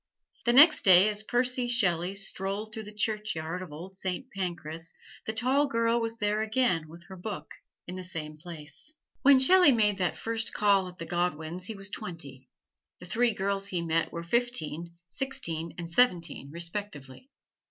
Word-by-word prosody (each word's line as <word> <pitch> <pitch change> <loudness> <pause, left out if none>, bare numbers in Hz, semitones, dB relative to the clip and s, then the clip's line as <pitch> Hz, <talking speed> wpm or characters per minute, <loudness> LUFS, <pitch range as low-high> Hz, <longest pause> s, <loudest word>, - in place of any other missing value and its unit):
The 240 - +3
next 300 +5 +8
day, 190 +2 +7
as 210 0 -2
Percy 245 +2 0
Shelley 190 -6 +1
strolled 200 +2 -4
through 220 -1 -6
the 210 - -9
churchyard 210 -6 -2
of 180 -4 -8
Old 175 +6 -9
Saint 190 +8 -4
Pancras, 170 -3 -4 0.3
the - - +1
tall 260 +6 +2
girl 230 -2 +1
was 225 0 -2
there 210 0 0
again 220 -8 +1
with 170 +2 -12
her 190 - -11
book, 195 +2 -6 0.3
in 180 +1 -7
the 185 - -6
same 160 -4 -6
place. 155 - -10 0.3
When 280 0 +7
Shelley 355 +4 +7
made 210 -5 +2
that 180 -2 0
first 225 0 -2
call 200 -2 +3
at 180 0 -11
the 165 - -6
Godwins 175 0 -2
he 220 - -5
was 195 0 -6
twenty. 140 -7 -7 0.5
The - - -10
three 230 +5 +1
girls 195 0 -1
he 180 -4 -2
met 165 0 0
were 170 - -5
fifteen, 170 -6 -1
sixteen 165 -8 -3
and 170 -1 -6
seventeen, 170 - +2
respectively. 170 - -6
195 Hz, 170 wpm, -29 LUFS, 170-225 Hz, 0.5 s, next